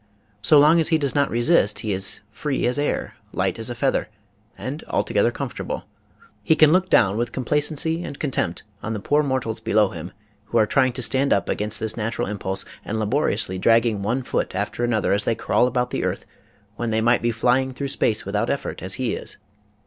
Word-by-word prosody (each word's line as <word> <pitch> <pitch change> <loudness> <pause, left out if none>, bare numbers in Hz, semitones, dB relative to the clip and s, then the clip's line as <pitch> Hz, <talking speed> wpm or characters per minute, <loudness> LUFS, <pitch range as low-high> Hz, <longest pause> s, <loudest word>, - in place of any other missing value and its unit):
So 150 +8 +5
long 150 +4 +6
as 160 - +2
he 160 - +3
does 140 -3 -1
not 140 -1 +2
resist 120 - +2
he 105 -2 -2
is 95 +2 -1
free 140 +3 -2
as 125 +4 +1
air, 145 - -1 0.2
light - - -1
as 115 - -4
a 120 - -4
feather, 135 -1 0 0.5
and 145 +5 -5
altogether 105 +3 +1
comfortable. 125 +1 -5 0.6
He 130 +10 +3
can 155 -1 +6
look 185 +2 +3
down 100 - +4
with 120 +1 -1
complacency 150 +5 0
and 140 - -7
contempt 100 - -2 0.2
on 110 - -3
the 110 - -3
poor 145 +9 +2
mortals 130 -6 -2
below 105 -2 +2
him 85 0 -8 0.3
who 115 - -1
are 110 - +5
trying 130 +2 +2
to 125 0 -4
stand 135 +3 +2
up 100 - +2
against 105 +2 -1
this 110 -1 -1
natural 115 0 -2
impulse 95 -1 -2 0.2
and 110 +1 -3
laboriously 105 -5 0
dragging 115 0 +3
one 120 +6 -1
foot 120 - -2
after 105 +4 -2
an 120 - +1
other 110 -3 +1
as 100 +1 +1
they 115 - 0
crawl 125 - +2
about 125 0 -1
the - - -2
earth - - -2 0.5
when 120 - -2
they 110 0 +1
might 120 +1 +3
be 120 - +1
flying 125 +3 +1
through 140 +2 -4
space 110 -5 0
without - - -1
effort - - -3
as 95 +2 -1
he 125 -3 -1
is. - - -6
120 Hz, 210 wpm, -23 LUFS, 105-140 Hz, 0.6 s, long